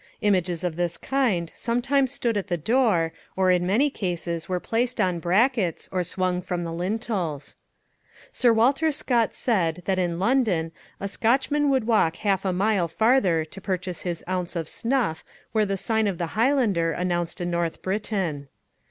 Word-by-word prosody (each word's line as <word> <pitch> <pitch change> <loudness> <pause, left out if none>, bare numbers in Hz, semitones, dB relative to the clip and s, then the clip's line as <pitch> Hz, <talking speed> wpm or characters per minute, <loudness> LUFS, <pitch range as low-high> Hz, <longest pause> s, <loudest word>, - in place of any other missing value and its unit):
Images 185 -4 +1
of 175 -3 -2
this 175 -1 -1
kind 225 -12 0
sometimes 255 +3 +1
stood 235 -4 -1
at 205 -1 -2
the 175 -3 -1
door, 180 - +2 0.2
or 190 -1 +3
in 180 0 +2
many 260 +10 +3
cases 175 - -3
were 180 -1 0
placed 240 +6 -1
on 180 -2 +1
brackets 190 - +1
or 185 -1 0
swung 180 +1 -1
from 175 0 -3
the 165 -1 -4
lintels. 180 -5 -3 0.8
Sir 245 -2 +3
Walter 275 +8 +3
Scott 240 -5 0
said 180 -7 0
that 190 -1 +1
in 175 -2 0
London 195 -6 +1 0.3
a 200 - -3
Scotchman 275 +8 +1
would 265 -4 +2
walk 210 -8 +3
half 200 0 0
a 190 - +2
mile 190 -1 +1
farther 190 -4 +2
to 190 +5 -11
purchase 185 -2 -3
his 175 -3 -4
ounce 180 -1 -2
of 165 -2 -2
snuff 230 -9 -1 0.3
where 215 -2 +2
the 195 0 -1
sign 220 +2 +1
of 195 -4 -2
the 170 -1 -4
Highlander 220 - +2
announced 175 -1 -2
a 175 - -2
North 170 -1 -2
Briton. 190 -7 -2
190 Hz, 170 wpm, -25 LUFS, 175-230 Hz, 0.8 s, or